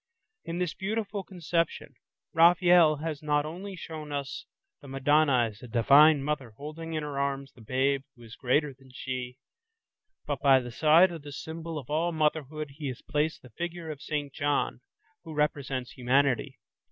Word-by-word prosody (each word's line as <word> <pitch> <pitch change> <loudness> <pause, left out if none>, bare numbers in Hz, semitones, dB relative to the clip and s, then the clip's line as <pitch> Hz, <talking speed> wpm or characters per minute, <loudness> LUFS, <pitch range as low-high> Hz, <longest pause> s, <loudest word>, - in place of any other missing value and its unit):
In 165 - -4
this 180 -3 -1
beautiful 210 0 -3
conception, 170 -3 -2 0.4
Raphael 170 -1 +6
has 155 -3 -3
not 150 -1 +1
only 185 +5 -6
shown 155 -3 -8
us 140 -1 -4 0.3
the 140 - -12
Madonna 135 -1 +3
as 105 - -17
a 125 - -9
Divine 140 +6 +6
Mother 135 -6 -3
holding 160 +3 -7
in 155 -1 -2
her 145 -2 -4
arms 140 0 -2
the 120 - -18
babe 130 +4 +1
who 120 - -16
is 115 -1 -11
greater 140 +3 +1
than 130 0 -20
she, 125 -1 -5 0.9
but 145 -2 -3
by 135 -2 +6
the 120 -1 -7
side 160 +7 +5
of 165 -2 -7
this 145 -1 -8
symbol 160 0 -6
of 145 -1 -8
all 165 +3 +1
motherhood, 155 -2 -1
he 150 - -3
has 125 -2 -6
placed 150 +2 -1
the 125 - -14
figure 170 +4 -5
of 145 -2 -9
St. 145 -2 -3
John, 145 -1 -1 0.4
who 160 - -8
represents 140 -4 -1
humanity. 130 0 +1
150 Hz, 170 wpm, -28 LUFS, 135-160 Hz, 0.9 s, Raphael